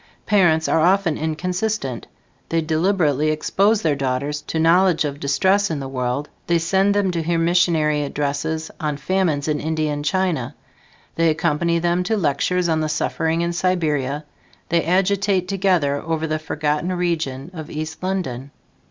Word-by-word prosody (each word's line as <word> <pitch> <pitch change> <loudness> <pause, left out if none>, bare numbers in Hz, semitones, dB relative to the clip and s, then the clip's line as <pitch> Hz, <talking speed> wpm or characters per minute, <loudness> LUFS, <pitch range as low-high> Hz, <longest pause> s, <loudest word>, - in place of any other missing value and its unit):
Parents 175 -6 +3
are - - +2
often 175 -1 +3
inconsistent: 175 - -2 0.4
they 165 - +1
deliberately 160 -2 +1
expose 200 +8 +1
their 155 -3 +2
daughters 140 +2 -2
to - - -2
knowledge 170 +1 +4
of 145 - -2
the 140 - -15
distress 190 +9 +2
in 155 -3 -2
the 135 - -5
world; 130 +2 -2 0.2
they 170 - +3
send 190 +5 +2
them 200 -2 +2
to 170 -2 -2
hear 165 +1 0
missionary 165 -3 +2
addresses 145 +2 -2
on 150 -3 -2
famines 160 -3 0
in 150 -1 0
India 155 -1 -1
and 145 0 -4
China; 155 -6 -1 0.6
they 165 0 +3
accompany 170 +1 +1
them 175 +1 +1
to 215 +5 0
lectures 175 +2 +1
on 160 -1 +1
the 155 - -1
suffering 160 +2 -1
in 170 0 -1
Siberia; 155 -6 0 0.4
they 170 0 +2
agitate 190 +1 +1
together 180 -7 +1
over 160 -1 -2
the 155 0 -1
forgotten 155 +2 -1
region 165 -5 -2
of 160 -3 -8
East 155 +1 -5
London. 160 -9 -3
160 Hz, 160 wpm, -21 LUFS, 150-180 Hz, 0.6 s, knowledge